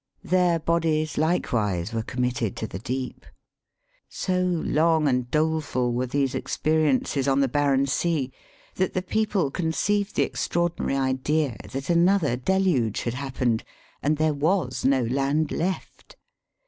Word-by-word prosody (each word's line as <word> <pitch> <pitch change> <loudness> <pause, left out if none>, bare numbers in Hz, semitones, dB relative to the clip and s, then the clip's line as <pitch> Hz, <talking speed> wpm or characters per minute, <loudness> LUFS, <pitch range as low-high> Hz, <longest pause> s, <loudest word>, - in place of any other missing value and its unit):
Their 180 -2 +3
bodies 160 -1 0
likewise, 110 - 0
were 115 - 0
committed 125 -2 -2
to - - -4
the 95 - -6
deep. 130 +3 -4 0.9
So 185 -1 -1
long 165 -3 +2
and 125 -2 0
doleful 150 -5 0
were 125 +2 -1
these 135 +1 0
expe 155 - -1
riences 140 -2 +2
on 135 - +2
the 135 - +3
barren 140 0 +2
sea, 140 -1 0 0.5
that 185 0 0
the 185 - 0
people 205 -7 0
conceived 195 +5 0
the - - +3
extraordinary 170 -5 -1
idea 135 +1 0 0.2
that 135 +4 -3
another 170 -5 +3
deluge 135 - +1
had 120 - -2
happened, 125 -3 -1 0.4
and 150 +1 +1
there 155 0 +2
was 145 -3 0
no 135 -1 +3
land 140 +5 0
left. 185 +3 -4
145 Hz, 135 wpm, -25 LUFS, 130-170 Hz, 0.9 s, Their